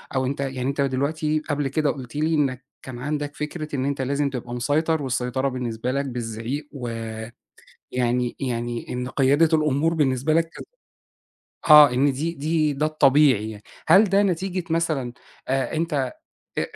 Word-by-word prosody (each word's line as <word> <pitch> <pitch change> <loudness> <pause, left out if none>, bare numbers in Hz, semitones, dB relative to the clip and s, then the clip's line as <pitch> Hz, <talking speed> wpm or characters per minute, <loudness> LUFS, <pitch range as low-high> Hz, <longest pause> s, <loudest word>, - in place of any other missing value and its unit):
أو 130 0 +1
أنت 135 +2 -3
يعني 135 -2 -3
أنت 140 +2 -1
دلوقتي 150 +3 0
قبل 145 -1 0
كده 150 +2 0
قُلت 130 -1 -9
لي 155 +2 +1
إنك 135 -3 0 0.2
كان 125 -2 -8
عندك 145 +1 -3
فكرة 150 0 -5
إن 130 0 -1
أنت 140 -1 -1
لازم 140 +2 0
تبقى 120 -2 -6
مسيطر، 150 +6 0
والسيطرة 130 0 -1
بالنسبة 125 -1 -3
لك 140 +1 -1
بالزعيق، 120 +3 -4
و 115 -5 -5 0.8
يعني 125 0 0
يعني 120 -2 -3
إن 125 0 -3
قيادة 145 +5 +3
الأمور 155 +2 +1
بالنسبة 140 -1 +1
لك 165 +1 +4
ك - - -10 1.1
آه 150 -1 +10
إن 135 +2 +2
دي 155 +6 -2
دي 155 0 0
ده 150 +2 0
الطبيعي 135 -7 +4
يعني. 105 -1 -10 0.3
هل 190 +7 +7
ده 200 0 +3
نتيجة 185 -1 -1
مثلًا 155 -7 0 0.4
آآ 135 0 0
أنت 150 -6 -1 0.5
أ - - +2
140 Hz, 160 wpm, -23 LUFS, 125-155 Hz, 1.1 s, آه